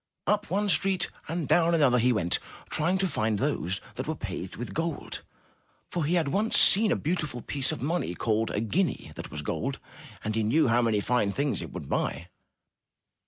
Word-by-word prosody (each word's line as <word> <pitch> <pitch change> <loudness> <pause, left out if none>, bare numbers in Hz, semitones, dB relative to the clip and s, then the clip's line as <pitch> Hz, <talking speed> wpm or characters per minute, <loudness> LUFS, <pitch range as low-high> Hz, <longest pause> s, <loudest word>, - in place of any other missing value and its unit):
Up 205 0 0
one 205 +3 0
street 185 0 +2 0.2
and 165 -2 -3
down 170 0 +4
another 135 -6 +4
he 125 +2 +3
went, 90 -7 +1 0.3
trying 175 +5 +2
to 190 0 +1
find 110 - 0
those 95 - -1 0.2
that 130 - -4
were 155 - -1
paved 95 -6 -6
with 120 - -6
gold, 165 -2 -3 0.7
for 170 -4 -1
he 170 +4 +1
had 160 -5 +1
once 210 +9 +2
seen 210 +1 +6
a - - +3
beautiful 150 -7 -2
piece 135 -2 +2
of 120 - -5
money 155 - -1
called 110 +2 0
a 105 - -1
guinea 175 - -1
that - - -7
was - - -5
gold, - - -2 0.5
and 110 - -2
he 110 - 0
knew 130 +8 +3
how 120 +1 +4
many 110 -3 +1
fine 110 -3 +1
things 140 +5 -1
it - - -7
would - - -7
buy. 90 - -2
140 Hz, 195 wpm, -27 LUFS, 110-175 Hz, 0.7 s, seen